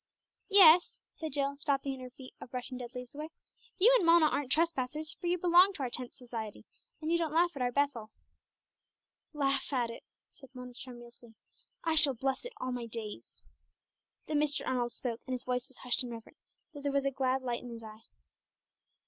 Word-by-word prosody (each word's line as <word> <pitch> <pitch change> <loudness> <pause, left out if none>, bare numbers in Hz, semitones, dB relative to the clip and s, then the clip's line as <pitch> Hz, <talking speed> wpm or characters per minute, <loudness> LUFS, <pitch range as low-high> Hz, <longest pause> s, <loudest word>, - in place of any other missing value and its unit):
"Yes," 360 -4 +7
said 315 -4 -6
Jill, 280 0 -1
stopping 280 -1 -1
in 265 - -8
her 255 0 -8
feat 255 +1 -13
of - - -9
brushing 250 0 -5
dead 245 0 -8
leaves 250 -1 -6
away; 305 +2 -6 0.5
"you 455 +7 +6
and - - +3
Mona 335 -1 +6
aren't 280 -3 -2
trespassers, 305 -1 0
for 350 - -6
you 355 +1 +2
belong 360 +3 +6
to 290 - -5
our 250 - -2
Tenth 250 0 -5
Society, 230 -5 -7 0.3
and 315 +1 -3
you 340 - +3
don't 325 -3 -1
laugh 345 +2 +3
at 275 - -5
our 245 0 +1
'Bethel.'" 260 -5 0 1.2
"Laugh 275 -2 0
at 245 -4 0
it?" 230 - -10 0.3
said 270 - -15
Mona 250 0 -8
tremulously. 240 -2 -12 0.5
"I 325 - +1
shall 300 -4 +5
bless 265 - -2
it - - -7
all 255 - -3
my 245 -2 -4
days!" 220 -2 -8 0.8
Then 300 -1 0
Mr. 300 0 0
Arnold 245 -2 0
spoke, 235 -2 -5
and 260 - -1
his 250 - -6
voice 250 0 -2
was 265 - -14
hushed 250 +1 +1
and 250 -2 -3
reverent, 230 -1 -10 0.3
though 290 - -9
there 285 0 -1
was 275 0 +1
a 275 - +1
glad 265 0 0
light 240 -2 -2
in 245 - -9
his 230 -1 -8
eye. 220 0 -12
265 Hz, 200 wpm, -32 LUFS, 245-305 Hz, 1.2 s, Yes